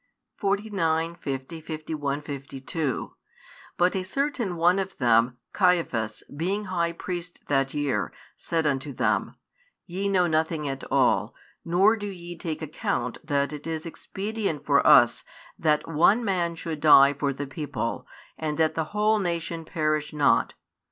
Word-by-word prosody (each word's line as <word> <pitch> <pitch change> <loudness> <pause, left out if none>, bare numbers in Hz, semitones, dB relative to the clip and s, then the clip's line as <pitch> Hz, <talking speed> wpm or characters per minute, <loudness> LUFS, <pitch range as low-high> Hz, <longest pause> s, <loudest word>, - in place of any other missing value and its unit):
49, 195 -6 0
50, 145 0 -5
51, 155 -2 -3
52 140 0 -4 0.6
But 180 +2 +3
a 190 - 0
certain 240 -1 -1
one 175 +3 +3
of 190 0 -4
them, 120 0 +3 0.2
Caiaphas, 165 - +1
being 195 +7 -1
high 170 -3 0
priest 175 +1 -6
that 135 -1 +1
year, 145 -2 0 0.2
said 165 -1 -1
unto 140 -1 -1
them, - - 0 0.5
Ye 195 +3 -2
know 185 -2 +3
nothing 160 -2 0
at 135 -1 -4
all, 110 -5 +2 0.3
nor 190 +6 +4
do 205 -2 -5
ye 175 -3 -7
take 160 -1 -5
account 125 -5 -2
that 140 -2 0
it 150 +1 -7
is 160 0 -3
expedient 195 -1 -4
for - - +4
us - - +6 0.4
that 150 -1 +2
one 175 +9 +3
man 175 -4 0
should 165 -2 -5
die 140 -2 +7
for 140 0 -1
the 140 +1 -4
people, 135 -3 -4 0.3
and 155 -2 -2
that 160 -1 +2
the 160 - -1
whole 215 +1 +3
nation 170 -3 -2
perish 155 -1 -1
not. 150 -2 +2
160 Hz, 145 wpm, -26 LUFS, 145-180 Hz, 0.6 s, die